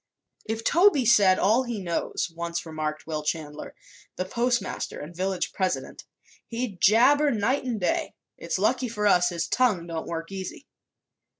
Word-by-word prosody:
"If 220 +1 -3
Toby 335 - +4
said 200 -5 +5
all 220 +6 +3
he 240 -4 -4
knows," 175 -1 -2
once 170 0 -4
remarked 155 -1 -4
Will 155 -1 -3
Chandler, 150 -1 -5 0.4
the 185 - -3
postmaster 240 0 -1
and 165 +4 -9
village 190 +1 -2
president, 185 -2 -3 0.4
"he'd 230 -6 -4
jabber 275 +8 +5
night 245 +4 0
an' 240 -3 -2
day. 180 - -1 0.2
It's - - -3
lucky 255 - +1
for 210 -2 -2
us 180 -3 +4
his 170 -2 -3
tongue 215 -10 +1
don't 165 -1 -5
work 165 +1 -5
easy." 195 +8 -7
195 Hz, 155 wpm, -26 LUFS, 170-240 Hz, 0.4 s, said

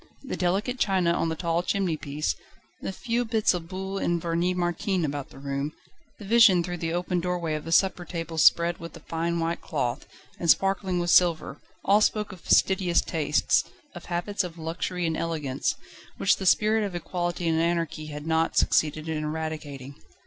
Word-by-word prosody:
The 275 - -4
delicate 200 +8 0
china 185 -4 +2
on 165 - 0
the 160 - -2
tall 170 0 0
chimney 185 -2 0
piece, 150 0 -2 0.5
the - - -3
few 235 +5 -1
bits 220 -3 +2
of 170 -2 -4
Buhl 190 +2 -4
and 170 -2 0
Vernis 170 +2 0
Martin 175 0 0
about 145 -1 -4
the - - -15
room, 140 +2 -3 0.4
the 205 - -10
vision 200 -5 +6
through 175 0 -4
the 165 0 -2
open 175 +1 -1
doorway 175 -2 -2
of 155 -1 -4
the 165 - -5
supper 185 +1 +3
table 165 -2 -5
spread 170 +2 +4
with 165 0 -9
a - - -15
fine 170 +2 -2
white 165 +1 -1
cloth, 135 -4 -3 0.3
and 170 - -1
sparkling 195 -1 +3
with 175 0 0
silver, 165 -5 +3 0.2
all 205 +2 +5
spoke 210 -1 +1
of 185 -3 -11
fastidious 185 -3 +3
tastes, 150 -2 +1 0.3
of 175 - -10
habits 185 +3 -1
of 175 -2 -7
luxury 170 +2 -3
and 160 -1 0
elegance, 150 -5 -1 0.4
which 195 - +3
the 190 - -3
spirit 215 +3 +4
of 195 -3 -4
Equality 175 0 -2
and 160 0 +2
Anarchy 165 -2 -1
had 150 0 -7
not 160 0 +1
succeeded 155 +1 +2
in 155 -1 -2
eradicating. 150 -3 -5
170 Hz, 185 wpm, -26 LUFS, 160-185 Hz, 0.5 s, vision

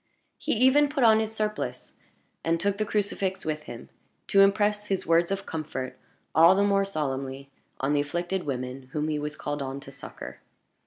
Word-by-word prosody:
He - - 0
even 265 +5 +5
put 280 -3 0
on 220 -1 +6
his 220 0 -1
surplice, 215 -1 -3 0.5
and 165 0 +1
took 200 +2 0
the 215 - 0
crucifix 200 -2 -1
with 155 -1 -2
him, 120 - -9 0.4
to 195 - +6
impress 210 +1 +3
his 195 -1 -1
words 165 +1 +3
of 195 0 -2
comfort 150 -5 -4 0.4
all 165 +4 +7
the 200 - +3
more 200 -1 +3
solemnly 140 -5 -4 0.3
on 135 +2 +1
the 145 - +3
afflicted 175 +5 -2
women 130 -1 -5
whom 150 0 -1
he 150 -1 -1
was 150 0 -4
called 145 0 -4
on 135 0 -4
to 135 - -11
succor. 135 0 -9
170 Hz, 180 wpm, -27 LUFS, 145-205 Hz, 0.5 s, all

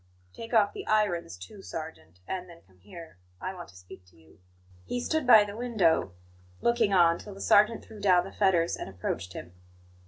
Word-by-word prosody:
"Take 230 - -9
off 215 -4 +3
the - - -8
irons, 175 - 0
too, 90 - -12
sergeant; 90 - -9
and 185 -1 -5
then 170 -1 -15
come 95 -1 -27
here. 105 - -13 0.2
I 185 - -5
want 175 -2 -10
to - - -18
speak 90 +1 -14
to 90 - -24
you." 80 +2 -22 0.4
He 245 - -4
stood 310 +2 -2
by 220 -4 +8
the 205 0 -8
window, 210 - +1 0.5
looking 235 -3 +1
on, 170 -3 +4
till 205 -2 -10
the - - -12
sergeant 215 +3 +3
threw 220 -1 -13
down 180 -3 +4
the 195 - -9
fetters 180 -4 +1
and - - -7
approached 90 0 -5
him. 90 -1 -9
180 Hz, 195 wpm, -28 LUFS, -, 0.5 s, by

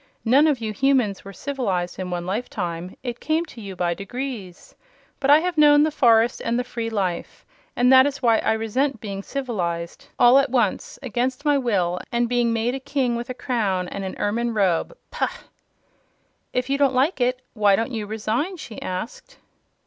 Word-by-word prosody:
"None 270 +7 +5
of 295 -3 +2
you 220 -2 -4
Humans 250 -4 +1
were 195 - -9
civilized 195 -9 -3
in 185 -1 -4
one 175 -1 -3
lifetime. 180 -4 -4
It 245 -2 -4
came 320 +2 0
to 250 -8 -12
you 195 -2 -7
by 175 -1 0
degrees. 205 -2 -7 0.5
But 275 -1 0
I 295 +2 +7
have 355 -2 -1
known 295 0 +7
the 310 - +1
forest 235 -4 +3
and 235 - 0
the 250 - 0
free 230 -2 -4
life, 190 -6 -3 0.3
and 250 +2 +4
that 260 +1 +8
is 285 -1 -4
why 230 -3 +3
I 220 - +1
resent 225 +4 -1
being 200 -2 -5
civilized 180 -10 -4
all 245 +3 +7
at 275 0 +1
once, 235 -6 0
against 255 +3 -2
my 295 -1 +4
will, 185 -8 0
and 240 0 +1
being 240 -1 +1
made 230 +2 0
a 270 - -3
King 265 -3 -1
with 235 +1 -5
a 255 - -4
crown 210 -8 -1
and 200 - -5
an 190 - -5
ermine 230 +2 -1
robe. 195 - +1
Pah!" - - 0 1.2
"If 250 0 -1
you 275 +1 0
don't 275 -2 +3
like 270 +4 +1
it, 250 +1 +1
why 205 -3 +4
don't 225 +4 -2
you 220 -3 -4
resign?" 225 - -2
she 230 -9 -9
asked. 230 - -6
235 Hz, 190 wpm, -23 LUFS, 200-265 Hz, 1.2 s, that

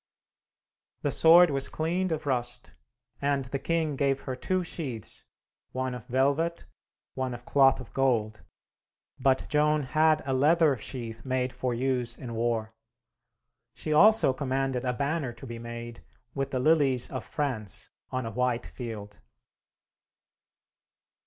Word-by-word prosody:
The - - +1
sword 170 0 +7
was 135 -1 0
cleaned 175 +3 -1
of 155 -1 -2
rust, 120 -3 -2 0.5
and 140 -1 0
the 135 +2 -4
king 160 -1 -1
gave 135 -1 +1
her 130 - -4
two 185 +8 -1
sheaths, 135 - -6 0.5
one 130 0 -2
of 125 -3 -8
velvet, 140 +7 +1 0.5
one 130 -2 -3
of 120 0 -12
cloth 135 -1 +4
of 130 - -11
gold, 115 -5 0 0.8
but 130 0 +2
Joan 150 0 +2
had 155 +4 +2
a 135 - -1
leather 150 +2 +4
sheath 115 -1 -7
made 130 -1 -1
for 125 -1 -2
use 125 -1 -1
in 120 -3 -7
war. 115 -1 -1 1.0
She 155 +5 -2
also 215 -3 +6
commanded 135 -1 -1
a 125 - 0
banner 140 -1 -2
to 135 - -11
be 120 -2 -7
made, 120 0 -8 0.3
with 135 -1 -2
the 130 - -2
Lilies 135 -3 +3
of - - -4
France 110 -9 -3 0.2
on 130 -2 -3
a 115 - -4
white 125 +1 0
field. 105 -4 -8
130 Hz, 140 wpm, -28 LUFS, 120-150 Hz, 1.0 s, sword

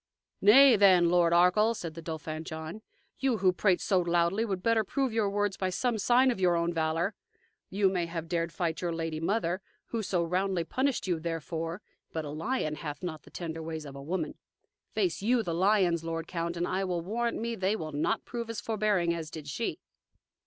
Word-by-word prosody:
"Nay, 255 +5 +8
then, 185 -4 +6
Lord 175 -1 +4
of 170 - +5
Arkell," 210 +6 +4
said 165 -6 -6
the 165 - -8
Dauphin 160 -1 -5
John, 160 +5 -7 0.4
"you, 265 -4 +1
who 185 -2 +3
prate 185 -1 +2
so 190 -3 +2
loudly, 175 +4 +1
would 190 -5 -3
better 230 -1 +3
prove 265 +3 -1
your 220 -3 +1
words 205 -1 -1
by 185 - -1
some 230 +4 -1
sign 250 +4 +4
of 235 - -4
your 180 -2 +3
own 170 +1 0
valor. 165 +4 0 0.6
You 195 0 +2
may 180 -3 0
have 165 -1 -5
dared 170 -1 -1
fight 165 -3 -2
your 175 - -1
lady 165 -1 -3
mother, 185 +1 0 0.3
who 230 - -2
so 185 -4 0
roundly 180 +1 0
punished 260 +7 -1
you 175 -4 0
therefor, 165 +2 -4 0.3
but 160 -1 -3
a - - -5
lion 155 - -2
hath 150 +2 -6
not 160 -4 -4
the - - -17
tender 165 -2 -5
ways 160 -1 -5
of 140 -1 -9
a 140 - -8
woman. 175 +7 -3 0.5
Face 370 - 0
YOU 235 +3 +2
the 170 - -2
lions, 180 -2 +3
lord 165 0 -3
count, 170 0 -3
and 175 - -1
I 190 +1 -1
will 180 -2 -1
warrant 230 +7 -1
me 235 +1 -2
they 195 -1 0
will 155 -7 -5
not 150 +9 -1
prove 235 -1 -5
as 230 - -3
forbearing 210 -6 +1
as 165 -2 -5
did 155 -3 -8
she." 140 - -3
180 Hz, 210 wpm, -29 LUFS, 165-210 Hz, 0.6 s, Nay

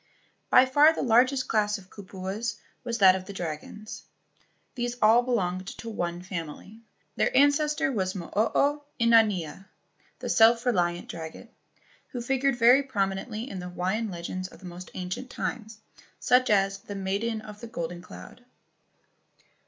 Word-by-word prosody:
By 255 - +7
far 290 +5 +5
the - - -2
largest 255 +2 +3
class 210 -1 +1
of 190 -2 -16
kupuas 195 +3 -5 0.3
was 235 -1 -2
that 190 -3 +7
of 185 -1 -5
the 200 - -8
dragons. 180 +5 -6 0.7
These 240 -1 -3
all 225 +3 +6
belonged 190 -7 -1
to 230 - -7
one 175 -3 -3
family. 185 +4 -7 0.4
Their - - +2
ancestor 295 +1 +3
was 190 -5 -2
Mo 175 -3 -7
o 285 +7 +2 0.2
inanea 210 -7 +2 0.5
(The - - -6
Self 230 +2 +5
reliant 175 -7 0
Dragon), 165 +7 -8 0.6
who 250 - -6
figured 270 +2 0
very 245 +3 +6
promi¬ 195 -8 -1
nently 225 +1 -6
in 195 - -6
the 180 0 -6
Hawaiian 190 +5 -2
legends 185 +1 -5
of - - -15
the 190 - -13
most 180 +1 -9
ancient 185 +8 -5
times, 220 -2 -5 0.4
such 250 +1 +3
as 195 -1 +2
"The 200 +1 -8
Maiden 200 +4 -2
of 210 -1 -11
the 235 - -7
Golden 175 -4 -5
Cloud." 245 +6 -12
210 Hz, 150 wpm, -27 LUFS, 185-240 Hz, 0.7 s, By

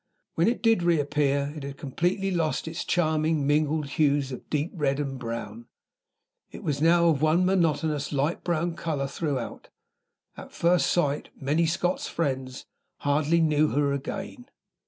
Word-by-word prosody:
When 165 - +2
it 240 +2 0
did 225 -4 +4
reappear, 145 -3 +1
it 150 - -6
had 140 0 -7
completely 175 +8 -1
lost 165 -3 -1
its 160 +1 -4
charming 155 -3 +1
mingled 150 +1 +1
hues 145 -1 +1
of 125 - -8
deep 150 +2 -1
red 145 -5 0
and 135 -2 -3
brown; 115 -1 -6 0.8
it - - -10
was 145 -1 -1
now 170 +1 +5
of 150 -4 +1
one 160 +4 +3
monotonous 160 -5 +1
light 145 +3 -1
brown 170 0 -1
color 155 -5 -2
throughout. 135 -4 -4 0.7
At - - -10
first 175 +1 +2
sight, 150 -5 0
Mary's 155 +4 +1
Scotch 180 +1 -1
friends 130 -5 -3 0.4
hardly 150 +3 +2
knew 155 -1 +3
her 145 -1 +1
again. 200 - -6
150 Hz, 150 wpm, -26 LUFS, 140-170 Hz, 0.8 s, now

